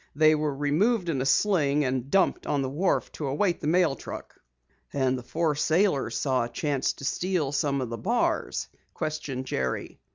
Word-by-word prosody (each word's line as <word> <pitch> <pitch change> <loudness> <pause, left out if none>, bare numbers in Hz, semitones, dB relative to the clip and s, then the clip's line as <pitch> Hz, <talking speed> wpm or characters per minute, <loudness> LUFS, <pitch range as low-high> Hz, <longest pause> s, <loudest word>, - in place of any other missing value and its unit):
They 155 +1 +6
were 150 -2 0
removed 170 - +1
in 140 -5 0
a 135 - 0
sling 145 -2 +3
and 130 0 -2
dumped 190 +4 +2
on 140 -2 +1
the 130 - -2
wharf 170 +8 0
to 150 - -5
await 170 +6 0
the - - -2
mail 170 -3 +3
truck." - - -8 0.6
"And 130 -2 +1
the 125 - -5
four 160 +5 0
sailors 160 +1 +1
saw 130 -4 +1
a - - -7
chance 140 +2 -1
to 140 - -9
steal 175 -2 0
some 140 -2 0
of 125 - -3
the 115 - -4
bars?" 235 +4 0 0.3
questioned 150 -5 -3
Jerry. 65 - -3
145 Hz, 185 wpm, -27 LUFS, 135-170 Hz, 0.6 s, They